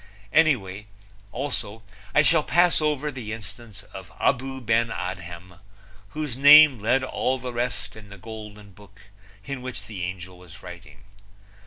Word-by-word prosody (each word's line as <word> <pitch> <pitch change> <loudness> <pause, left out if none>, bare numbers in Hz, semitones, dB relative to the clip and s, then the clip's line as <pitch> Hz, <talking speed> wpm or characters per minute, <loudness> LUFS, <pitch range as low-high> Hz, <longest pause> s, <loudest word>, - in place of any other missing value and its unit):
Also, 120 -5 -4 0.3
I 150 - +6
shall 160 +1 +4
pass 175 +2 +3
over 150 -1 -1
the 125 -5 -7
instance 115 -1 -11
of - - -10
Abou 130 +1 0
Ben 115 -1 +1
Adhem, 90 -2 -7 0.5
whose 150 0 -5
name 145 -1 +8
led 125 +5 +1
all 130 0 -1
the 125 -1 -7
rest 120 -1 -4
in 105 -2 -13
the 100 - -11
golden 105 0 -10
book 100 +1 -19 0.4
in 140 -2 -5
which 125 -5 -7
the 105 -3 -8
angel 90 0 -7
was 90 -3 -15
writing. 90 -2 -12
115 Hz, 140 wpm, -24 LUFS, 100-135 Hz, 0.5 s, name